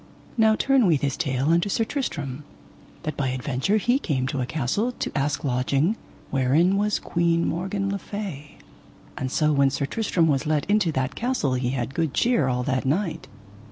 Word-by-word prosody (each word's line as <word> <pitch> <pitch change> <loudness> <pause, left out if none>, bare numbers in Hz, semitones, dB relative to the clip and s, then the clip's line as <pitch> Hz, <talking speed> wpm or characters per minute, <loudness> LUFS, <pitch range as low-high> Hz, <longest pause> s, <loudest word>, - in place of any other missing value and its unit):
Now 220 -2 +4
turn 270 -2 +3
we 165 -4 +4
this 140 -1 -1
tale 135 -3 0
unto 170 +4 +3
Sir 225 - +1
Tristram, 150 - -4 0.6
that 155 -2 -3
by 140 - -1
adventure 130 - 0
he 245 +5 +2
came 135 - -1
to 135 - -2
a 125 - -2
castle 160 - -1
to - - -5
ask 140 0 0
lodging, 140 - +1 0.4
wherein 145 +8 +3
was 210 +1 +1
Queen 170 -1 +1
Morgan 195 +3 -2
le 200 - -2
Fay; 185 -10 -7 0.6
and 130 -1 -3
so 150 +1 +2
when 140 -1 +4
Sir 140 +1 -2
Tristram 180 0 +1
was 145 0 +1
let 150 -2 0
into 205 -5 +2
that 130 0 -1
castle 240 - -1
he 125 -1 0
had 125 0 -3
good 160 -2 -1
cheer 235 - +2
all 125 -1 0
that 130 -1 0
night. 165 +6 -1
150 Hz, 185 wpm, -24 LUFS, 135-200 Hz, 0.6 s, Now